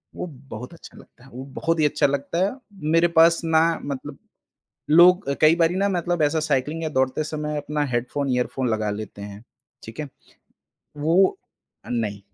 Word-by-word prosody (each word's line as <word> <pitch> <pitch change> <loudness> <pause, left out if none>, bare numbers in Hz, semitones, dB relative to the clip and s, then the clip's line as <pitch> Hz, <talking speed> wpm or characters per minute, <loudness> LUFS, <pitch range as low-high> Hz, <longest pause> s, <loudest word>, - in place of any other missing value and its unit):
वो - - -4 0.2
बहुत 125 +7 -8
अच्छा 170 - -14
लगता - - -18
है, 135 - -16
वो 130 +2 -7
बहुत 165 0 -1
ही 155 - +4
अच्छा 145 - +2
लगता 140 +3 -3
है। 200 - -1 0.4
मेरे 165 +1 +5
पास 165 +1 +6
ना 160 0 +4 0.2
मतलब 140 0 -6 0.7
लोग 180 +3 +6
अ, 140 - +1
कई 155 +1 +5
बारी 170 0 +2
ना 200 +1 +1
मतलब 175 -3 -1
ऐसा 150 +2 +2
साइक्लिंग 150 +2 -1
या 160 - -1
दौड़ते 130 +1 0
समय 150 0 -4
अपना 145 +1 -2
हेडफोन, 125 +3 -2
ईयरफोन 125 +1 -1
लगा 110 -2 -1
लेते 105 -1 -7
हैं, 100 +1 -9 0.4
ठीक 115 +7 -8
है? 150 - -5 0.9
वो 170 - +3 0.5
अ, - - -13
नहीं, 110 -4 -2
150 Hz, 180 wpm, -23 LUFS, 125-165 Hz, 0.9 s, पास